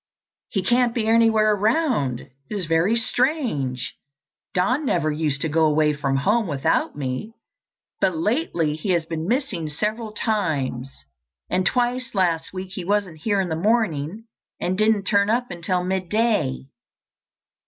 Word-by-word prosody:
"He 195 - -1
can't 240 +3 +2
be 230 -3 0
anywhere 225 -1 +4
around. 210 - +1
It - - -17 0.2
is 200 -4 -3
very 165 +7 +2
strange. 230 - 0 0.6
Don 250 +11 +2
never 165 - +1
used 150 -2 -1
to - - +1
go 160 +1 +2
away 150 0 +3
from 140 -2 -1
home 205 +10 +2
without 140 -4 0
me, 140 - -4 0.6
but 185 -4 +1
lately 170 - 0
he 180 +5 -1
has 170 -2 +1
been 160 0 -4
missing 210 - -1
several 215 +7 -3
times, 140 - -2 0.5
and 185 0 +2
twice 245 -1 0
last 175 -4 +1
week 185 0 -6
he 185 -1 -5
wasn't 190 -4 -1
here 205 +4 0
in 185 -2 0
the 160 - -1
morning 195 -2 0 0.4
and 185 - -1
didn't 215 0 +2
turn 200 0 +2
up 240 -1 0
until 180 +1 -1
midday." 190 - 0
185 Hz, 145 wpm, -23 LUFS, 155-220 Hz, 0.6 s, anywhere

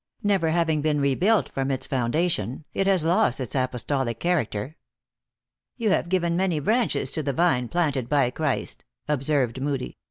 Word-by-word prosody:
Never 195 -5 +2
having 160 -2 +1
been 150 -1 +1
rebuilt 180 +10 +2
from 135 0 -2
its 130 -1 -2
foundation, 130 - -1
it 195 - 0
has 185 -5 +3
lost 170 - +2
its 130 -4 -4
apostolic 130 -2 -1
character." 150 -6 -1 0.5
" - - -63
You 225 -4 +1
have 170 - +1
given 175 -2 +1
many 180 -3 +1
branches 225 - 0
to 160 - 0
the 140 -2 -2
vine 130 -6 +2
planted 145 -6 -1
by 140 -4 +2
Christ," 155 0 -2 0.2
observed 135 -3 0
Moodie. 140 -2 -3
150 Hz, 160 wpm, -25 LUFS, 130-175 Hz, 0.5 s, has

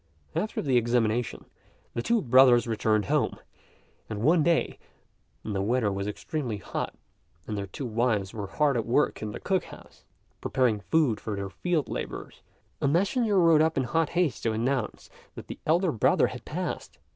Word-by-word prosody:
After 215 - -1
the 130 -3 +2
examination, 120 0 0 0.5
the 120 - -2
two 230 - +1
brothers 125 -2 +6
returned 110 -2 +1
home; - - 0 0.7
and 110 -1 -4
one 160 +4 +5
day, 170 +1 +1 0.6
when 110 - -4
the 95 - -1
weather 110 0 +1
was 100 +1 -3
extremely 120 +2 -3
hot, - - -4 0.5
and 105 - -4
their 100 -1 -4
two 130 +8 -6
wives 110 -4 0
were 105 -3 -5
hard 145 +3 +1
at 115 - -2
work 130 +5 +1
in 105 -1 -4
the - - -7
cook 190 -2 0
house, - - -14 0.4
preparing 125 -5 +1
food 130 -2 +1
for 110 - -4
their 100 -1 -5
field 165 - -1
labourers, - - -6 0.4
a - - +2
messenger 200 - +2
rode 165 -3 +5
up 160 -1 +2
in 135 - +2
hot 160 +4 0
haste 175 -6 +1
to 115 - 0
announce 120 +2 -2 0.2
that - - -8
the - - -8
elder 170 +2 +3
brother 110 - +3
had - - -6
passed. - - -5
125 Hz, 175 wpm, -27 LUFS, 110-155 Hz, 0.7 s, brothers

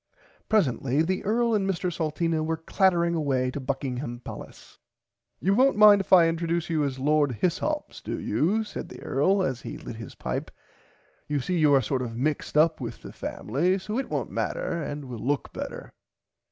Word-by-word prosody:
Presently 145 - +2
the 185 +3 -1
earl 230 +2 +1
and 195 -2 +1
Mr 180 -1 -1
Salteena 160 0 -1
were 160 +1 -1
clattering 170 +1 +2
away 135 -5 0
to 145 - -5
Buckingham 130 -2 -3
palace. - - -11 0.6
You 195 - +2
wont 260 +2 +4
mind 210 -1 +8
if - - -11
I 175 -3 +8
introduce 165 0 -1
you 155 -2 +1
as 135 -2 -2
Lord 145 0 +2
Hyssops 170 - -2
do - - -4
you 175 - +1
said 215 - -7
the - - -11
earl 190 +8 +2
as 130 -7 -2
he - - -7
lit 110 - -8
his 115 -4 -9
pipe. - - -4 0.8
You 150 -1 0
see 175 +6 -1
you 150 -2 +5
are 135 - +3
sort 130 +4 -1
of 115 -2 -5
mixed 150 +3 -1
up 160 +1 +4
with - - -6
the - - -9
family 165 - -1
so 210 +5 -3
it 270 - -4
wont - - -2
matter 170 -2 -2
and 145 -1 -5
will 125 -3 -7
look 140 +5 -2
better. - - -7
160 Hz, 185 wpm, -26 LUFS, 135-185 Hz, 0.8 s, mind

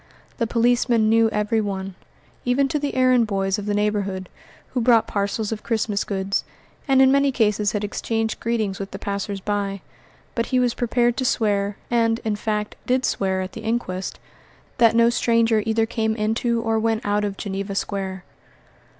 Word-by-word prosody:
The 230 - +1
policeman 235 -1 +2
knew 225 0 +4
every 215 +1 0
one, 195 -2 -4 0.5
even 260 +3 +2
to 300 - 0
the 285 -2 -3
errand 255 -3 +4
boys 195 0 0
of 205 - -6
the 205 - 0
neighbourhood, 200 -3 -1 0.4
who 250 - -1
brought 230 -2 +4
parcels 205 +1 -2
of 215 -1 -3
Christmas 220 -3 -1
goods, 195 -1 -1 0.4
and 265 -1 +5
in 265 - +5
many 280 0 +3
cases 210 -4 +1
had 210 -1 -1
exchanged 225 +2 -2
greetings 220 -4 -1
with 195 0 -5
the - - -7
passers 200 0 -3
by; 200 -1 -2 0.5
but 230 - -1
he 255 - +2
was 245 -2 +2
prepared 240 -1 +1
to 260 - 0
swear, 205 -4 +1
and, 230 -1 +2
in 215 -1 0
fact, 210 0 -3
did 255 +1 +2
swear 190 -1 0
at 185 - -5
the 225 - -8
inquest, 220 -5 -3 0.6
that 230 -1 +5
no 235 0 +5
stranger 230 -2 +2
either 225 0 +2
came 220 -1 -1
into 230 +2 0
or 225 -1 +1
went 225 0 0
out 205 0 +1
of 200 -1 -3
Geneva 195 0 -4
Square. 190 -2 -3
220 Hz, 175 wpm, -23 LUFS, 200-235 Hz, 0.6 s, and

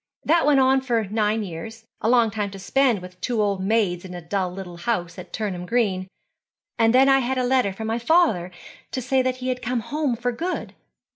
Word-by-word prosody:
That 330 0 +3
went 290 -2 +5
on 265 0 +4
for 240 -4 0
nine 215 +1 0
years, 220 +6 -8 0.2
a 220 - +1
long 235 -3 +4
time 205 -1 -2
to 195 - -9
spend 205 +1 +1
with 180 0 -12
two 240 -3 -1
old 200 -2 +1
maids 195 -4 +1
in 180 -1 -8
a - - -5
dull 185 +2 -2
little 180 -2 -8
house 175 -3 -2
at - - -10
Turnham 185 -5 -4
Green, 195 -6 0 0.7
and 225 0 +5
then 260 +3 +5
I 270 0 +5
had 260 +1 -1
a 255 - +1
letter 250 -5 +2
from 220 +4 -6
my 225 +2 -1
father 235 - +3 0.4
to - - -1
say 255 +1 +1
he 255 0 -5
had 250 0 -2
come 245 0 -1
home 290 0 -1
for 245 +2 -1
good. 345 +9 -4
225 Hz, 215 wpm, -23 LUFS, 195-255 Hz, 0.7 s, went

